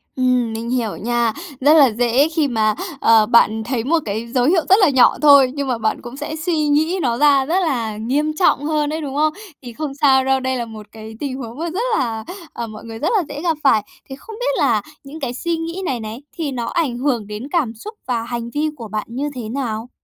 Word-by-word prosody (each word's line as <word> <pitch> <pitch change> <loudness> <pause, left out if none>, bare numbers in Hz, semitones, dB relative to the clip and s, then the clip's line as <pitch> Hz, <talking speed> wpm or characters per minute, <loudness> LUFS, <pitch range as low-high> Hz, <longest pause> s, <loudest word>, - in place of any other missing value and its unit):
Ừm, 250 -3 +1
mình 230 +1 -4
hiểu 240 -4 -1
nha, 235 -1 0 0.3
rất 295 +3 +6
là 280 -7 +6
dễ 245 +6 +2
khi 315 -2 0
mà, 215 -3 +1 0.3
ờ, 225 -2 +5
bạn 220 -1 +3
thấy 235 -2 -2
một 325 +5 +2
cái 220 +3 -3
dấu 245 +1 +1
hiệu 335 +2 +3
rất 385 - +8
là 365 - +6
nhỏ 260 -3 +4
thôi, 280 -3 +7
nhưng 280 -1 -2
mà 245 -3 0
bạn 220 -1 -1
cũng 240 +3 -9
sẽ 295 +2 -5
suy 320 +1 -1
nghĩ 315 +6 +1
nó 240 -3 0
ra 280 -2 +4
rất 350 +6 +1
là 230 -10 -1
nghiêm 280 +8 0
trọng 290 -5 +3
hơn 300 -1 0
ấy, 320 - -3
đúng 275 -2 -5
không? 305 +1 +2 0.3
Thì 240 -2 -8
không 295 +1 -4
sao 270 -3 +4
đâu, 265 0 +2
đây 260 0 -2
là 235 - -3
một 215 -2 -10
cái 220 0 -10
tình 275 -3 -3
huống 240 0 -8
mà 335 0 -2
rất 390 +8 -2 0.2
là, 225 -3 -2 0.3
à, 235 - -5
mọi 215 -1 -10
người 225 0 -8
rất 320 - 0
là 365 - +1
dễ 290 +1 -6
gặp 330 -3 0
phải. 220 -6 +4 0.3
Thì 265 - -6
không 440 +10 -11
biết - - 0
là - - +2 0.2
những 290 +3 -10
cái 255 -3 -3
suy 335 +5 -2
nghĩ 335 +3 -5
này 250 -6 -1
này 220 +4 -7 0.2
thì 305 -4 -2
nó 240 -2 -3
ảnh 275 -4 -1
hưởng 245 -5 -1
đến 210 +3 -6
cảm 285 -10 0
xúc 425 - -9
và 235 -2 -1
hành 235 0 -5
vi 305 +1 0
của 230 -6 -8
bạn 215 0 -4
như 275 +5 -3
thế 225 -3 -6
nào? 235 -3 -4
260 Hz, 250 wpm, -19 LUFS, 230-300 Hz, 0.3 s, rất